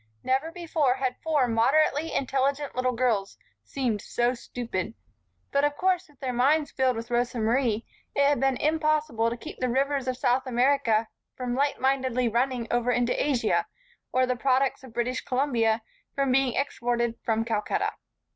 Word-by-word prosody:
Never 270 +5 0
before 320 -6 0
had 260 -1 -2
four 300 -5 +2
moderately 285 +7 +2
intelligent 275 +2 -1
little 255 0 +1
girls 230 -5 0 0.3
seemed 240 -7 -2
so 240 +1 0
stupid. 230 -4 -5 0.6
But 280 0 +2
of 290 0 +1
course 370 -1 +1
with 290 - -24
their 255 -2 -3
minds 290 +5 +2
filled 260 -2 +1
with 230 +1 -6
Rosa 240 +1 0
Marie, 230 0 +1 0.3
it 280 - +3
had 290 0 +2
been 270 -1 +2
impossible 305 -6 +1
to 235 - -4
keep - - -9
the 255 - 0
rivers 275 +1 0
of 255 -1 -1
South 255 +1 +1
America 245 -3 +2 0.3
from 250 -1 -3
lightmindedly 260 -3 +1
running 245 0 0
over 240 0 +1
into 245 0 +2
Asia, 275 -5 +1 0.4
or 255 0 +3
the 250 0 0
products 265 +1 +1
of 260 - -11
British 240 +2 -1
Columbia 235 -4 +1 0.3
from 275 -2 +1
being 260 -1 +2
exported 240 -4 -1
from 225 0 0
Calcutta. 215 -2 -1
255 Hz, 160 wpm, -27 LUFS, 240-275 Hz, 0.6 s, it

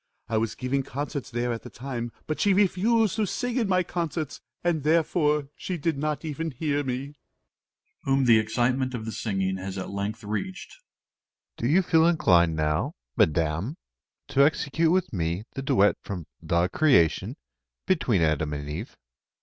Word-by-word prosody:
I 115 -1 0
was 110 0 -1
giving 135 +2 -1
concerts 140 +2 -5
there 120 0 -1
at 115 - -5
the - - -10
time; 120 -2 -5
but 155 - -3
she 200 -2 +3
refused 210 +2 +2
to 215 -2 +1
sing 245 +5 -2
in 230 -4 +1
my 185 -1 +3
concerts, 165 -4 -3 0.2
and 170 -3 +1
therefore 150 -2 +2
she 185 - -4
did 165 0 0
not 150 +2 -2
even 160 +2 -3
hear 145 +1 -1
me. 130 -2 -1
MR. 130 - -5
SILVER 140 - -12 0.9
(whom 135 -1 +2
the 115 -2 +6
excitement 125 +4 0
of 110 -2 -5
the 110 - -4
singing 95 -3 -1
has 95 +1 -5
at 95 - -5
length 100 +3 -4
reached). 180 - -4 0.8
Do 120 - -2
you 175 +8 +4
feel 165 -1 +4
inclined 85 - +4
now, 75 -1 0 0.2
Madam, 85 - +1 0.5
to 140 - +4
execute 155 +2 +2
with 180 -5 +1
me 85 +1 -1
the 135 - -4
duet 105 -6 +3
from 90 -5 -6 0.2
"The 85 +1 +1
Creation," 130 - +3 0.5
between 120 - +2
Adam 75 -1 +1
and 70 0 -5
Eve? 85 - -6
135 Hz, 170 wpm, -26 LUFS, 100-160 Hz, 0.9 s, the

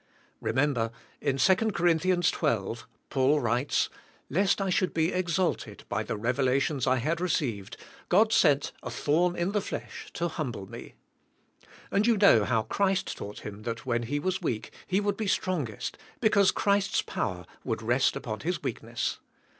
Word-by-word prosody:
Remember, 130 -3 +1 0.3
in 135 -2 0
2 185 +8 +5
Cor. 225 +3 0 0.2
12, 160 - 0 0.2
Paul 140 +2 +3
writes, 125 +2 +1 0.4
"Lest 195 +7 +2
I 195 -1 0
should 180 0 +1
be 165 +2 +2
exalted 175 - -1
by 100 +1 0
the 110 - -3
revelations 130 +3 +1
I 130 - +4
had 155 +7 -1
received, 120 - -1 0.3
God 215 +5 +4
sent 150 -10 +4
a 125 - -5
thorn 160 +8 +1
in 175 +2 0
the 205 0 +1
flesh - - -6
to 170 - -1
humble 125 - -4
me," 115 +3 -10 1.0
and 205 +3 +2
you 230 -2 +4
know 195 - +6
how 115 -3 +1
Christ 195 - 0
taught 105 +1 -7
him 105 0 -8
that 115 +2 -5
when 120 -2 0
he 125 +5 -2
was 185 +5 -1
weak 115 -10 -2 0.2
he 190 - +2
would 205 -1 -1
be 220 - -2
strongest, 155 - -2 0.2
because 205 -4 +4
Christ's 200 -1 +2
power - - -3 0.2
would - - -3
rest - - +2
upon - - -4
his - - -2
weakness. - - -3
150 Hz, 160 wpm, -28 LUFS, 120-185 Hz, 1.0 s, know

